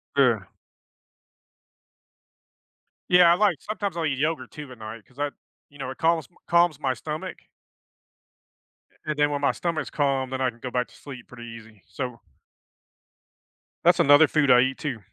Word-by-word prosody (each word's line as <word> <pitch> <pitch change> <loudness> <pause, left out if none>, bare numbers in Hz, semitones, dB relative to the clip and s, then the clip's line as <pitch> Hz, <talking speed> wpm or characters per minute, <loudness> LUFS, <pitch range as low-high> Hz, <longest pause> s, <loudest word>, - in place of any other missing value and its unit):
Yeah. 125 -7 +3 2.7
Yeah, 180 -1 +7
I - - +5
like 195 -4 +2
sometimes 200 -4 -4
I'll 165 - -1
eat 140 -3 -1
yogurt 150 -1 -1
too 150 -3 -9
at 125 - -11
night 110 0 -9
'cause 125 - -21
I 145 0 -1 0.4
you 145 - -18
know, 135 - -4
it 130 - -7
calms 165 -1 +1 0.2
calms 170 -4 +3
my 135 -3 0
stomach. 150 +5 -6 1.7
And 155 -1 -2
then 145 0 +3
when 145 -1 -2
my 140 - +3
stomach's 170 -3 -3
calm, 135 -3 0
then 130 0 -4
I 130 - +2
can 120 -1 -14
go 125 +1 -6
back 125 0 0
to - - -20
sleep 130 -4 -11
pretty 120 -1 -11
easy, 110 -4 -13
so 120 +6 -5 1.7
That's 175 - +5
another 145 +2 +7
food 150 -3 +2
I 125 -1 +7
eat 130 +1 0
too. 135 -7 -4
140 Hz, 165 wpm, -25 LUFS, 125-155 Hz, 2.7 s, Yeah